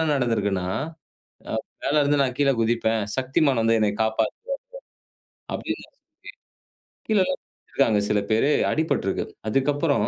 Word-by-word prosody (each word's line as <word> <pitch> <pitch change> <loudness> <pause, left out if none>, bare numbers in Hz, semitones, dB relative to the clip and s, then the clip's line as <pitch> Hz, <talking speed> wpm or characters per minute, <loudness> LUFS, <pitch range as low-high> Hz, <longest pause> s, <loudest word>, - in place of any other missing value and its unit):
நடந்திருக்குன்னா, 105 -8 0 0.9
"அ - - -1 0.3
மேல 150 +1 +3
இருந்து 145 0 +2
நான் 125 -2 0
கீழே 140 -1 +4
குதிப்பேன், 115 -1 +1
Shaktimaan 130 -1 +2
வந்து 115 0 +3
என்னைய 105 -1 +2
காப்பாத்துவாரு." 110 0 0 1.2
அப்படின்னு - - -3
சொல்லி, - - -23 1.1
கீழல்லாம் 185 -4 +2
குதிச்சுருக்காங்க 110 -7 0
சில 105 - +3
பேரு 115 +7 +3 0.2
அடிபட்ருக்கு. 140 - 0 0.2
அதுக்கப்பறம் 145 +4 +1
130 Hz, 115 wpm, -24 LUFS, 110-145 Hz, 1.2 s, கீழே